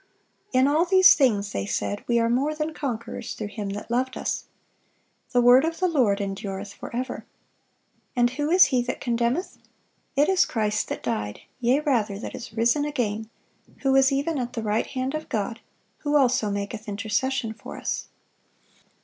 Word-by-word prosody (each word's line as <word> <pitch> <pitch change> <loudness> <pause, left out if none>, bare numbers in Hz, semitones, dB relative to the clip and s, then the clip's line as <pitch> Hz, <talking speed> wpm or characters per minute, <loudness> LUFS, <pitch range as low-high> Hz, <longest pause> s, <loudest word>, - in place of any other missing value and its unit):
"In 255 +1 +4
all 305 +4 +3
these 375 +1 +7
things," 210 -8 +2
they 100 - -3
said, 100 0 -2
"we 235 - +2
are 230 0 +3
more 270 +6 +1
than 310 +1 -3
conquerors 245 -7 -4
through 210 -1 -5
Him 205 -1 -5
that 205 +3 -6
loved 255 +2 0
us."(583) - - -9
"The 245 - +5
word 245 +3 +7
of 330 +1 -2
the 370 - +3
Lord 245 - +2
endureth 195 0 -4
forever."(584) 250 +5 -5 0.9
And 240 -1 +4
"who 290 +3 -2
is 360 +2 +7
he 255 -3 +1
that 250 +1 -4
condemneth? 240 +8 -1 0.6
It 290 +2 +4
is 375 -1 +3
Christ 215 -2 0
that - - -5
died, 105 0 -3 0.2
yea 250 +4 +2
rather, 225 -9 0
that 210 - -6
is 240 - -8
risen 235 +6 +2
again, 225 -7 -2 0.5
who 270 -1 +2
is 270 +1 +5
even 285 +2 0
at 245 -1 -4
the 230 - -3
right 215 +1 0
hand 260 +1 -3
of 310 0 -5
God, 225 +2 -2 0.4
who 295 0 -1
also 250 -6 +3
maketh 205 +2 -4
intercession 220 +4 -1
for 220 - -10
us." - - -3
245 Hz, 175 wpm, -25 LUFS, 215-280 Hz, 0.9 s, these